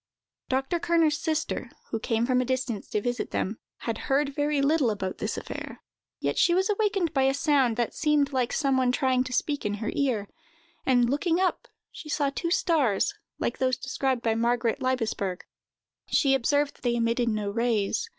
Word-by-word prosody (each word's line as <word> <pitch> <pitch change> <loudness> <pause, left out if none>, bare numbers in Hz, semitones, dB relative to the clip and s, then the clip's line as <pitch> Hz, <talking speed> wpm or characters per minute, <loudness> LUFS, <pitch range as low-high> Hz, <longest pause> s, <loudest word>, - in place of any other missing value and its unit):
Dr. 270 +6 0
Kerner's 325 -3 +2
sister, 320 0 -2 0.2
who 225 - -1
came 225 +1 0
from 255 0 +2
a - - +1
distance 255 -4 -2
to 210 - -1
visit 245 +2 -2
them, 210 +4 -2 0.2
had 225 -1 -3
heard 280 +1 +2
very 290 0 0
little 280 -2 +3
about 195 -3 -3
this - - -2
affair, - - -7 0.4
yet - - -1
she 345 - +4
was 380 +3 +2
awakened 405 -5 0
by 270 - +2
a 270 0 +2
sound 275 -6 +2
that 240 -2 0
seemed 295 -2 +1
like 250 -2 +1
some 275 -3 +1
one 255 -1 +3
trying 255 -1 +2
to 255 - -6
speak 290 +3 -1
into 205 0 -1
her 220 +1 -3
ear; 245 -8 0 0.6
and, 245 -2 +4
looking 325 +6 +1
up, 370 -1 0 0.2
she 305 - -10
saw 285 -2 +1
two 335 +4 -2
stars, 320 - +2 0.2
like 235 - -2
those 255 -1 +1
described 260 -2 -1
by 225 - +2
Margaret 235 0 +1
Laibesberg. 225 -8 -1 0.7
She 275 -2 +3
observed 285 +3 +1
that - - -26
they 240 -1 +1
emitted 235 +1 +1
no 210 -2 -1
rays. 225 -2 0
260 Hz, 185 wpm, -27 LUFS, 235-295 Hz, 0.7 s, she